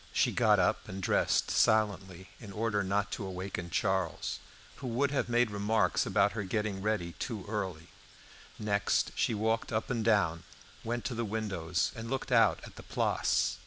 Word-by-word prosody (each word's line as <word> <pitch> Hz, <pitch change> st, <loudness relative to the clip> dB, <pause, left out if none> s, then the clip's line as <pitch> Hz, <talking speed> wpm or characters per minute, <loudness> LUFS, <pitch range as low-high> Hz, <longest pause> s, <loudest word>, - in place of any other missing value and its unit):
She -, -, +2 dB
got -, -, +4 dB
up -, -, +1 dB
and 95 Hz, -, -5 dB
dressed 95 Hz, -, +1 dB
silently, 95 Hz, -4 st, +1 dB
in 105 Hz, -4 st, -9 dB
order 105 Hz, 0 st, 0 dB
not 100 Hz, +1 st, 0 dB
to -, -, -4 dB
awaken 95 Hz, -2 st, -5 dB
Charles, 95 Hz, -1 st, -1 dB, 0.4 s
who 130 Hz, -, -6 dB
would 130 Hz, +4 st, +1 dB
have 140 Hz, -3 st, 0 dB
made 120 Hz, -2 st, +2 dB
remarks 105 Hz, +2 st, +1 dB
about 100 Hz, -1 st, +3 dB
her 110 Hz, -, -3 dB
getting 105 Hz, 0 st, -2 dB
ready 100 Hz, -5 st, -1 dB
too 110 Hz, -6 st, -4 dB
early. 95 Hz, -6 st, -3 dB, 0.7 s
Next 100 Hz, -1 st, +1 dB
she 115 Hz, -, 0 dB
walked 110 Hz, +2 st, 0 dB
up 110 Hz, +3 st, -1 dB
and 115 Hz, -3 st, 0 dB
down, 100 Hz, -7 st, +2 dB, 0.4 s
went 120 Hz, +1 st, -3 dB
to 130 Hz, -, -2 dB
the 115 Hz, 0 st, -2 dB
windows, 100 Hz, -6 st, -1 dB
and 115 Hz, 0 st, -6 dB
looked 135 Hz, 0 st, -3 dB
out -, -, +5 dB
at -, -, -12 dB
the -, -, -8 dB
Place. -, -, 0 dB
105 Hz, 170 wpm, -31 LUFS, 95-115 Hz, 0.7 s, out